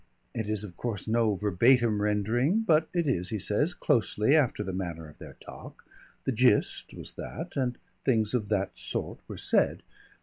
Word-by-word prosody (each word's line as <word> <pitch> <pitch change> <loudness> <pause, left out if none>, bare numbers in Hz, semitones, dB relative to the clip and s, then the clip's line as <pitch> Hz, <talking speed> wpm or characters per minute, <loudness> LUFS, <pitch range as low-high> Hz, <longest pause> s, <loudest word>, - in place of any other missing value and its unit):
It 110 -2 -3
is 105 -1 -2
of 95 -4 -9
course 115 -5 -4
no 110 -2 +2
verbatim 105 +3 +3
rendering, 115 - +1
but 160 -7 +3
it 170 -2 0
is, 90 -11 0
he 110 - -2
says, 125 - 0
closely 120 -1 +2
after 130 -8 +2
the 95 -2 -4
manner 85 -4 -4
of 75 - -16
their - - -10
talk, - - -12 0.4
the - - 0
gist 125 -2 +2
was - - -7
that, 170 +3 -7
and 125 -3 -1 0.3
things 110 -4 +2
of 110 -5 -1
that 100 -2 0
sort - - -4
were - - -7
said. - - +1
110 Hz, 175 wpm, -28 LUFS, 105-130 Hz, 0.4 s, verbatim